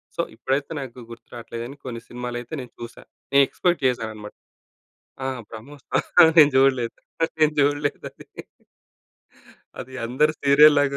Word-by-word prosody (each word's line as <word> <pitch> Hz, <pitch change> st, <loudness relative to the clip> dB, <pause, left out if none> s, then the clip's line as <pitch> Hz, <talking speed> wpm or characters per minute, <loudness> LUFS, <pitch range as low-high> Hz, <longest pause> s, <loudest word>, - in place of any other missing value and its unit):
So 170 Hz, -, 0 dB
ఇప్పుడైతే 135 Hz, +6 st, -2 dB
నాకు 130 Hz, -2 st, -8 dB
గుర్తు 115 Hz, -, -13 dB
రావట్లేదు 115 Hz, 0 st, -7 dB
గాని 140 Hz, +3 st, -10 dB
కొన్ని 115 Hz, -2 st, -6 dB
సినిమాలైతే 120 Hz, +2 st, -6 dB
నేను 125 Hz, -2 st, -11 dB
చూసా. 115 Hz, -, -9 dB, 0.3 s
నేను 140 Hz, 0 st, +6 dB
ఎక్స్‌పెక్ట్ 175 Hz, -4 st, 0 dB
చేశానన్నమాట. 110 Hz, -4 st, -4 dB, 0.9 s
ఆ! -, -, -3 dB, 0.2 s
'బ్రహ్మోత్సవం' 145 Hz, +6 st, +1 dB
నేను 145 Hz, -2 st, +7 dB
చూడలేదు. 130 Hz, -3 st, +2 dB, 0.4 s
నేను 155 Hz, -1 st, +4 dB
చూడలేదది. 145 Hz, 0 st, -2 dB, 1.5 s
అది 130 Hz, -, -12 dB
అందరు 150 Hz, +6 st, +1 dB
సీరియల్‌లాగా 145 Hz, 0 st, +5 dB
135 Hz, 120 wpm, -23 LUFS, 120-145 Hz, 1.5 s, నేను